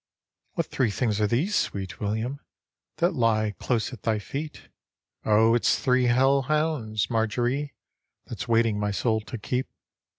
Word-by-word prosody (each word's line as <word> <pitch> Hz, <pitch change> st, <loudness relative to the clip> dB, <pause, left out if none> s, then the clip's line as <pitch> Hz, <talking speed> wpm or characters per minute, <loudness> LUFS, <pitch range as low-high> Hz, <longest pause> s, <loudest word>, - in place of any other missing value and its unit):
" -, -, -52 dB
What -, -, 0 dB
three 125 Hz, -4 st, 0 dB
things 105 Hz, 0 st, 0 dB
arc 105 Hz, -, +2 dB
these, 165 Hz, -, +1 dB
sweet 95 Hz, -2 st, -2 dB
William, 110 Hz, +7 st, -2 dB, 0.6 s
That 175 Hz, +2 st, +2 dB
lie 110 Hz, -3 st, +2 dB
close 120 Hz, 0 st, -1 dB
at 115 Hz, -, -10 dB
thy 110 Hz, -2 st, +1 dB
feet? 145 Hz, +9 st, -6 dB, 0.2 s
" -, -, -67 dB
" -, -, -38 dB
O 110 Hz, +2 st, +5 dB
it's 120 Hz, -, +3 dB
three 125 Hz, -1 st, +2 dB
hell 135 Hz, +3 st, +4 dB
hounds, 135 Hz, -8 st, -1 dB
Marjorie, 120 Hz, +5 st, 0 dB, 0.5 s
That's -, -, -6 dB
waiting 115 Hz, -2 st, +2 dB
my 105 Hz, 0 st, 0 dB
soul 110 Hz, +2 st, 0 dB
to 120 Hz, +3 st, -7 dB
keep." 125 Hz, +4 st, -2 dB
115 Hz, 165 wpm, -26 LUFS, 110-130 Hz, 0.6 s, O